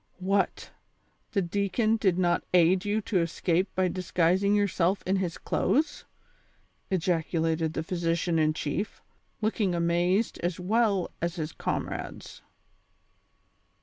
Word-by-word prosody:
" -, -, -41 dB, 0.2 s
What! 200 Hz, -1 st, 0 dB, 0.6 s
the 200 Hz, -3 st, +2 dB
deacon 200 Hz, +5 st, +1 dB
did 190 Hz, -5 st, +2 dB
not 175 Hz, -2 st, +2 dB
aid 180 Hz, +2 st, +4 dB
you 210 Hz, +1 st, 0 dB
to 200 Hz, -2 st, 0 dB
escape 170 Hz, +2 st, 0 dB
by 185 Hz, 0 st, +2 dB
dis 180 Hz, 0 st, -5 dB
guising 185 Hz, +4 st, +3 dB
yourself 195 Hz, -2 st, +1 dB
in 190 Hz, +1 st, +1 dB
his 180 Hz, -3 st, -2 dB
clothes? 285 Hz, -, 0 dB, 0.4 s
" -, -, -40 dB
ejacidated 165 Hz, -3 st, 0 dB
the 160 Hz, -, -2 dB
physician 170 Hz, -1 st, 0 dB
in 155 Hz, 0 st, +3 dB
chief, 170 Hz, +9 st, -3 dB, 0.4 s
looking 210 Hz, -4 st, 0 dB
amazed 175 Hz, +5 st, +1 dB
as 175 Hz, +1 st, -2 dB
well 200 Hz, -1 st, +1 dB
as 170 Hz, 0 st, -1 dB
his 155 Hz, -3 st, -3 dB
comrades. -, -, -5 dB
180 Hz, 130 wpm, -28 LUFS, 170-200 Hz, 0.6 s, aid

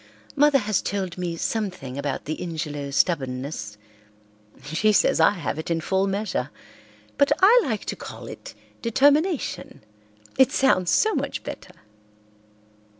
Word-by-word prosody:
"Mother 290 Hz, 0 st, +5 dB
has 215 Hz, -5 st, 0 dB
told 190 Hz, -3 st, -3 dB
me 170 Hz, -2 st, -3 dB
something 185 Hz, -, -3 dB
about 140 Hz, -1 st, -3 dB
the 155 Hz, -, -4 dB
Ingelow 150 Hz, -4 st, -4 dB
stubbornness. 130 Hz, -, -1 dB, 0.9 s
She 160 Hz, +9 st, +1 dB
says 210 Hz, -, +3 dB
I -, -, +7 dB
have 150 Hz, -, -4 dB
it 160 Hz, -, -5 dB
in 165 Hz, -1 st, 0 dB
full 190 Hz, +4 st, 0 dB
measure, 200 Hz, 0 st, -2 dB, 0.7 s
but 280 Hz, -, +4 dB
I 450 Hz, +6 st, +7 dB
like 220 Hz, -4 st, -3 dB
to -, -, -3 dB
call -, -, -9 dB
it -, -, -10 dB, 0.3 s
determination, 285 Hz, -, +1 dB, 0.6 s
it 265 Hz, -, +6 dB
sounds 185 Hz, -10 st, +2 dB
so 435 Hz, 0 st, +3 dB
much -, -, -3 dB
better. -, -, -9 dB
185 Hz, 135 wpm, -24 LUFS, 150-230 Hz, 0.9 s, I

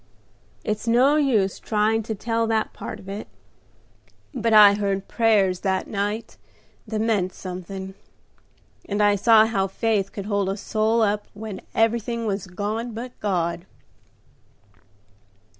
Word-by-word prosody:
It's 215 Hz, +2 st, -3 dB
no 255 Hz, +5 st, +4 dB
use 225 Hz, -10 st, +1 dB
trying 220 Hz, +1 st, +1 dB
to 220 Hz, -, -1 dB
tell 230 Hz, +2 st, -1 dB
that 220 Hz, -1 st, 0 dB
part -, -, -7 dB
of 190 Hz, -, -14 dB
it; 200 Hz, +2 st, -6 dB, 1.1 s
but 230 Hz, -3 st, -1 dB
I 210 Hz, -2 st, +9 dB
heard 200 Hz, -1 st, -2 dB
prayers 205 Hz, -6 st, +2 dB
that 190 Hz, -1 st, -1 dB
night 205 Hz, +2 st, -3 dB, 0.5 s
that 215 Hz, 0 st, -3 dB
meant 205 Hz, -5 st, 0 dB
something, 190 Hz, +1 st, -7 dB, 1.0 s
and 205 Hz, 0 st, -1 dB
I 205 Hz, 0 st, +4 dB
saw 220 Hz, +2 st, +6 dB
how 195 Hz, -4 st, 0 dB
faith 200 Hz, -1 st, -1 dB
could 200 Hz, -, -6 dB
hold 200 Hz, -2 st, 0 dB
a 195 Hz, -, -2 dB
soul 220 Hz, +2 st, +1 dB
up 210 Hz, 0 st, 0 dB
when 210 Hz, -2 st, -7 dB
everything 230 Hz, +1 st, +1 dB
was 200 Hz, -2 st, -2 dB
gone 215 Hz, +5 st, -4 dB
but 245 Hz, +2 st, -6 dB
God." 175 Hz, -3 st, -1 dB
210 Hz, 135 wpm, -23 LUFS, 195-225 Hz, 1.1 s, I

